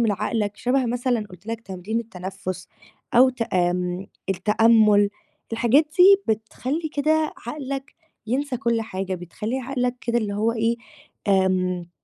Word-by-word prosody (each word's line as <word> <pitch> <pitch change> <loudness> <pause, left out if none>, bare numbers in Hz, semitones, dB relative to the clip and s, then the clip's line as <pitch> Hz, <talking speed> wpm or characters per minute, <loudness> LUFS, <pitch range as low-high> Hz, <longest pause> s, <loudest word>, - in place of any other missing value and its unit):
من 225 -3 +3
عقلك 210 0 -1
شَبه 255 0 +1
مثلًا 245 -2 0
قُلت 180 +3 -14
لك 230 0 -4
تمرين 195 +2 -4
التنفُّس 190 -3 -6 0.5
أو 250 +2 +7
ت 250 -2 -4
آمم 180 -1 0 0.2
التأمُّل، 210 +1 +4 0.4
الحاجات 240 +7 +4
دي 390 - +6
بتخلّي 260 +9 -4
كده 310 +1 +2
عقلك 275 0 -5 0.3
ينسى 260 +3 -1
كل 235 -2 0
حاجة 190 -3 -4
بتخلّي 185 +8 -4
عقلك 250 -1 -1
كده 235 0 0
اللي 210 -3 -2
هو 220 +3 +1
إيه، 230 +1 +1 0.5
آمم 185 -2 +1
225 Hz, 135 wpm, -23 LUFS, 195-250 Hz, 0.5 s, أو